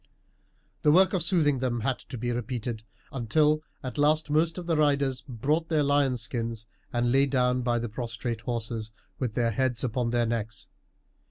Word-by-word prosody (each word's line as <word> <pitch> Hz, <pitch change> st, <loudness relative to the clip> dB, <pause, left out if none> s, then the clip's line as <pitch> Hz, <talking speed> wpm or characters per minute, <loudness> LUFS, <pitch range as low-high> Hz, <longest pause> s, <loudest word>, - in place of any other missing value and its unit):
The 150 Hz, -, +5 dB
work 190 Hz, +5 st, +5 dB
of 185 Hz, -, +1 dB
soothing 155 Hz, -6 st, +3 dB
had 130 Hz, -1 st, 0 dB
then 125 Hz, +3 st, 0 dB
to 125 Hz, -, -5 dB
be 120 Hz, +1 st, -2 dB
repeated, 120 Hz, -1 st, -3 dB, 0.3 s
until 150 Hz, +5 st, +2 dB, 0.2 s
at 130 Hz, +3 st, -5 dB
last 150 Hz, +1 st, +2 dB
most 160 Hz, +3 st, +2 dB
of 180 Hz, -, -5 dB
the 165 Hz, -1 st, +1 dB
riders 140 Hz, -4 st, +2 dB
brought 150 Hz, +7 st, 0 dB
their 155 Hz, -3 st, +2 dB
lions' 140 Hz, -4 st, +2 dB
skins 115 Hz, -2 st, -3 dB, 0.3 s
and 120 Hz, 0 st, +1 dB
lay 135 Hz, +2 st, +4 dB
down 125 Hz, -1 st, +2 dB
by 120 Hz, -1 st, +1 dB
the 120 Hz, 0 st, -2 dB
prostrate 115 Hz, 0 st, -4 dB
horses, 115 Hz, -2 st, -3 dB, 0.3 s
with 120 Hz, -5 st, -2 dB
their 115 Hz, -1 st, +2 dB
heads 125 Hz, 0 st, 0 dB
upon 120 Hz, -1 st, 0 dB
their 120 Hz, 0 st, +2 dB
necks. 110 Hz, -2 st, -3 dB
125 Hz, 175 wpm, -27 LUFS, 115-145 Hz, 0.3 s, The